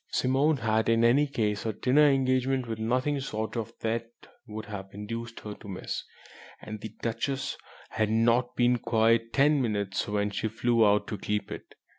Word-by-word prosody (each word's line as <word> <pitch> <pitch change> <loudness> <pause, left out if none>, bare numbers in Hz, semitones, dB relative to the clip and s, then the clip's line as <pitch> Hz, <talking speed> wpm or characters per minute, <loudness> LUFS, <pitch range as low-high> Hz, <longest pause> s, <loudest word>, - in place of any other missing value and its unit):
Simone 140 +4 +2
had 110 -1 +1
in 115 0 +3
any 135 +5 +4
case 105 -7 -1
a 110 - -2
dinner 140 +7 +4
engagement 130 -1 +1
which 110 -1 -4
nothing 130 +6 0
short 110 -4 -4
of 115 -1 -3
death 115 +1 -1 0.4
would 110 0 -6
have 95 -3 -7
induced 115 +3 -6
her 105 - -6
to 105 - -13
miss; 95 -2 -5 0.6
and 105 0 -8
the 110 - -5
Duchess 135 +4 -2 0.4
had 110 -1 0
not 120 +3 +2
been 120 0 +3
gone - - -17
quite 115 0 +2
ten 145 +1 +3
minutes 100 -5 -1
when 105 0 0
she 105 - -2
flew 115 +1 +2
out 105 0 +4
to 105 - -5
keep 105 +1 -2
it. - - -9
115 Hz, 180 wpm, -28 LUFS, 110-130 Hz, 0.6 s, any